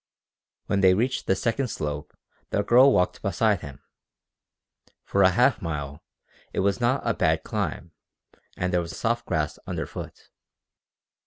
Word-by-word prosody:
When 100 Hz, -, 0 dB
they 95 Hz, -1 st, +6 dB
reached 125 Hz, +5 st, -1 dB
the 95 Hz, -, +3 dB
second 120 Hz, +6 st, -1 dB
slope 75 Hz, -8 st, -5 dB, 0.3 s
the 105 Hz, -, 0 dB
girl 130 Hz, +5 st, +6 dB
walked 90 Hz, -7 st, +1 dB
beside 100 Hz, 0 st, +1 dB
him. 70 Hz, -2 st, -10 dB, 1.2 s
For 100 Hz, -, 0 dB
a 95 Hz, -, +7 dB
half 125 Hz, +8 st, +3 dB
mile 75 Hz, -3 st, -5 dB, 0.5 s
it -, -, 0 dB
was 100 Hz, +4 st, 0 dB
not 120 Hz, +3 st, +1 dB
a 115 Hz, -, +2 dB
bad 80 Hz, -4 st, +1 dB
climb 85 Hz, -, -3 dB, 0.7 s
and 90 Hz, 0 st, -1 dB
there 90 Hz, -, +3 dB
was 85 Hz, -, -7 dB
soft 115 Hz, +1 st, -1 dB
grass 80 Hz, -4 st, -1 dB
underfoot. -, -, -6 dB
95 Hz, 145 wpm, -25 LUFS, 85-115 Hz, 1.2 s, a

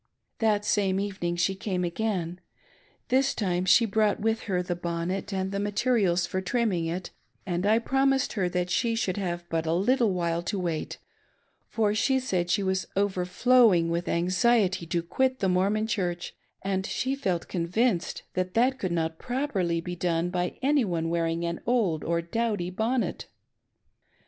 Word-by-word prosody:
The 215 Hz, -2 st, +2 dB
same 195 Hz, -2 st, +1 dB
evening 190 Hz, -4 st, -2 dB
she 175 Hz, +3 st, +1 dB
came 190 Hz, -2 st, -2 dB
again. 180 Hz, -1 st, -2 dB, 0.7 s
This 265 Hz, +2 st, +2 dB
time 180 Hz, -3 st, 0 dB
she 210 Hz, +6 st, +6 dB
brought 215 Hz, -1 st, +1 dB
with 225 Hz, +1 st, +1 dB
her 180 Hz, -2 st, +1 dB
the 175 Hz, -1 st, -2 dB
bonnet 175 Hz, +3 st, -3 dB
and 190 Hz, 0 st, -2 dB
the 200 Hz, -, -2 dB
materials 205 Hz, -3 st, +1 dB
for 185 Hz, -, -3 dB
trimming 190 Hz, -4 st, 0 dB
it, 175 Hz, +3 st, -4 dB, 0.3 s
and 180 Hz, +1 st, -1 dB
I 220 Hz, +2 st, +5 dB
promised 270 Hz, +3 st, +1 dB
her 190 Hz, -5 st, 0 dB
that 180 Hz, 0 st, -2 dB
she 230 Hz, +2 st, +1 dB
should 195 Hz, -5 st, -1 dB
have 175 Hz, -3 st, -3 dB
but 165 Hz, -1 st, -2 dB
a 160 Hz, -, +2 dB
little 230 Hz, +4 st, +2 dB
while, 170 Hz, -2 st, -1 dB
to 200 Hz, +4 st, -3 dB
wait; 170 Hz, -4 st, -3 dB, 0.7 s
for 215 Hz, -2 st, +1 dB
she 265 Hz, +5 st, +2 dB
said 185 Hz, -9 st, -1 dB
she 200 Hz, +2 st, +2 dB
was 190 Hz, 0 st, -1 dB
overflowing 190 Hz, 0 st, +3 dB
with 170 Hz, +1 st, -2 dB
anxiety 185 Hz, +1 st, +2 dB
to 170 Hz, +1 st, -1 dB
quit 260 Hz, +9 st, 0 dB
the 195 Hz, -, 0 dB
Mor 185 Hz, +1 st, +2 dB
mon 215 Hz, +1 st, 0 dB
Church, 180 Hz, -6 st, -2 dB, 0.3 s
and 190 Hz, 0 st, -1 dB
she 260 Hz, +6 st, -1 dB
felt 185 Hz, -11 st, -2 dB
convinced 180 Hz, +3 st, 0 dB
that 185 Hz, 0 st, -2 dB
that 255 Hz, +3 st, +3 dB
could 185 Hz, -, -2 dB
not 160 Hz, -1 st, -1 dB
properly 220 Hz, -11 st, -1 dB
be 180 Hz, +1 st, -5 dB
done 170 Hz, 0 st, 0 dB
by 180 Hz, -1 st, -2 dB
any 285 Hz, 0 st, +3 dB
one 165 Hz, -4 st, -1 dB
wearing 165 Hz, 0 st, 0 dB
an 170 Hz, 0 st, -3 dB
old 210 Hz, -11 st, +1 dB
or 170 Hz, 0 st, 0 dB
dowdy 205 Hz, -1 st, -1 dB
bonnet. 230 Hz, +6 st, -1 dB
190 Hz, 170 wpm, -27 LUFS, 175-220 Hz, 0.7 s, she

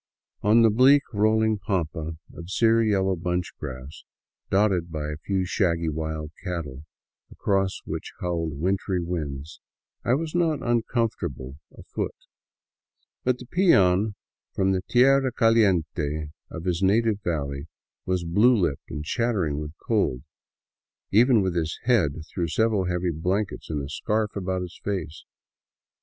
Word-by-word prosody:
On 110 Hz, +3 st, +5 dB
the 115 Hz, -, +5 dB
bleak, 135 Hz, +6 st, +6 dB
rolling 110 Hz, +1 st, +2 dB
pampa 80 Hz, -4 st, -2 dB, 0.2 s
of 85 Hz, +1 st, -9 dB
sear 115 Hz, +3 st, +3 dB
yellow 95 Hz, -3 st, +2 dB
bunchgrass, 85 Hz, -6 st, -5 dB, 0.5 s
dotted 95 Hz, -4 st, +2 dB
by 75 Hz, -2 st, -3 dB
a 75 Hz, -, -5 dB
few 95 Hz, +4 st, -1 dB
shaggy 85 Hz, -4 st, +1 dB
wild 80 Hz, 0 st, -4 dB
cattle, 80 Hz, -6 st, -5 dB, 0.5 s
across 95 Hz, -1 st, 0 dB
which -, -, -5 dB
howled 80 Hz, -5 st, -2 dB
wintry 95 Hz, +1 st, 0 dB
winds, 80 Hz, -4 st, -5 dB, 0.4 s
I 120 Hz, -, +3 dB
was 160 Hz, +2 st, -3 dB
not 165 Hz, -4 st, +1 dB
uncomfortable 110 Hz, -, -1 dB, 0.2 s
afoot; -, -, -4 dB, 1.1 s
but 125 Hz, -1 st, +1 dB
the 125 Hz, -, -10 dB
peon 105 Hz, -, +3 dB, 0.4 s
from 95 Hz, 0 st, +2 dB
the 95 Hz, -1 st, 0 dB
" -, -, -48 dB
tierra 135 Hz, +1 st, +4 dB
caliente 85 Hz, -, +1 dB
" -, -, -54 dB
of 80 Hz, -, -6 dB
his 90 Hz, -1 st, 0 dB
native 105 Hz, +2 st, +3 dB
valley 70 Hz, -3 st, -3 dB, 0.4 s
was 90 Hz, -1 st, -1 dB
blue 105 Hz, +9 st, +4 dB
lipped 85 Hz, -10 st, -1 dB
and 75 Hz, -, -5 dB
chattering 95 Hz, -9 st, 0 dB
with 75 Hz, +1 st, -7 dB
cold, 65 Hz, 0 st, +1 dB, 0.9 s
even 115 Hz, 0 st, +5 dB
with 95 Hz, -2 st, -1 dB
his 80 Hz, -2 st, -2 dB
head 110 Hz, -, +3 dB, 0.2 s
through 85 Hz, -3 st, -1 dB
several 105 Hz, +2 st, +1 dB
heavy 90 Hz, 0 st, -1 dB
blankets 95 Hz, +6 st, -2 dB
and 75 Hz, -3 st, -2 dB
a -, -, -5 dB
scarf 105 Hz, +8 st, -1 dB
about 95 Hz, -2 st, -2 dB
his 90 Hz, 0 st, -9 dB
face. 90 Hz, -6 st, -4 dB
95 Hz, 140 wpm, -25 LUFS, 80-110 Hz, 1.1 s, bleak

